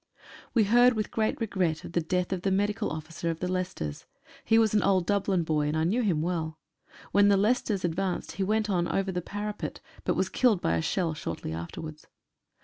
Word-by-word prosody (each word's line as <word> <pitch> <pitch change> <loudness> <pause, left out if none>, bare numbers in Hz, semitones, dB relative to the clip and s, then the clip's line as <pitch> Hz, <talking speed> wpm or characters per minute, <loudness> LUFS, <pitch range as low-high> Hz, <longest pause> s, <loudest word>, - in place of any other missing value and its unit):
We 225 - +5
heard 245 +4 +5
with 215 -2 -2
great 220 -1 0
regret 185 -8 -1
of - - -8
the 170 - +1
death 180 +3 -1
of 185 - -3
the 195 - 0
medi 205 +2 +2
cal 210 0 -2
officer 160 +2 -4
of 165 -1 -3
the 180 - -2
Leicesters. 180 - -3 0.4
He 225 - +4
was 220 -2 +4
an 210 - +4
old 185 -3 +2
Dublin 195 -3 +1
boy, 150 -2 0
and 150 +2 0
I 160 - +1
knew 205 +10 +1
him 175 -9 +1
well. 160 -2 -2 0.5
When 205 0 +5
the 200 -1 +5
Leicesters 210 -2 +1
advanced 180 +1 -2
he 185 +4 -2
went 215 +2 +1
on 175 -4 +1
over 195 0 0
the 180 -1 -2
parapet, 205 +3 -5 0.2
but - - 0
was - - +1
killed 235 -7 +3
by 85 - +1
a 85 - 0
shell 170 - 0
shortly 85 - -5
afterwards. 150 - -7
185 Hz, 215 wpm, -28 LUFS, 160-205 Hz, 0.5 s, We